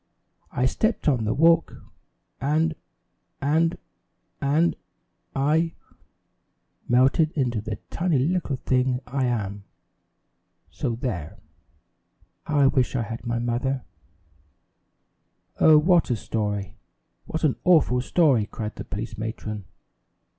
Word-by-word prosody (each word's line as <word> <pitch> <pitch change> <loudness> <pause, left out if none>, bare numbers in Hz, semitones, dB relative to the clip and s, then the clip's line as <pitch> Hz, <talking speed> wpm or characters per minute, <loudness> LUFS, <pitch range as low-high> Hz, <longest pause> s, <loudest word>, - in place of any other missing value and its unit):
I 125 - 0
stepped 220 - 0
on 125 -7 +2
the 105 - +1
walk, 165 +2 +4 0.6
and 155 +3 +1 0.7
and 160 +4 +1 0.6
and 150 +5 +2 0.6
I 155 +4 +2 1.1
melted 130 +6 +4
into 125 -7 0
the 110 0 -4 0.2
tiny 170 -4 +1
little 155 +1 0
thing 125 0 0
I 130 +1 -1
am 105 -5 -2 1.1
so 115 - -2
there! 105 - -4 1.1
How 150 -2 +2
I - - +6
wish 135 -2 +2
I 120 - +1
had 115 +2 -7
my 120 0 0
mother 120 +3 -1 0.9
" - - -41
"Oh, 155 -1 +7
what 170 +2 +4
a 120 - +2
story! 105 -2 -3 0.5
What 160 - -4
an 150 -5 +2
awful 155 -8 +4
story!" 130 -7 +3
cried 110 -2 -6
the - - -5
police 105 +1 -6
matron. 110 -2 -5
130 Hz, 115 wpm, -25 LUFS, 115-155 Hz, 1.1 s, Oh